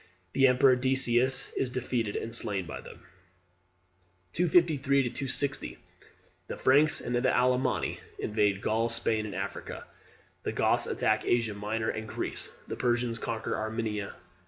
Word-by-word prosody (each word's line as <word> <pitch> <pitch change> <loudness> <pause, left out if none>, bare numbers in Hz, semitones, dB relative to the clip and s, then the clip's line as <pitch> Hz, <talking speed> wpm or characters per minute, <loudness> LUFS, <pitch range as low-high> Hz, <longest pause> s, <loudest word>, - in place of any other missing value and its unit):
The 135 0 +5
emperor 130 0 +5
Decius 130 0 +1
is 130 - -1
defeated 125 -4 -2
and 115 - -4
slain 100 -5 -2
by - - -7
them. - - -13 1.3
253 155 -6 +3
260. 140 +2 -2 0.7
The - - -5
Franks 145 +4 +4
and 125 - -2
Alemanni 125 0 +1 0.2
invade 105 -2 0
Gaul, 115 +2 +1
Spain, 110 -2 0
and 100 - -7
Africa. 95 - -5 0.6
The - - -3
Goths - - +2
attack 110 0 +1
Asia 115 -3 +1
Minor 105 +2 -2
and 110 0 -5
Greece. - - -4
The - - -4
Persians 120 -2 0
conquer 110 0 -3
Armenia. 110 -2 -3
120 Hz, 130 wpm, -29 LUFS, 110-130 Hz, 1.3 s, The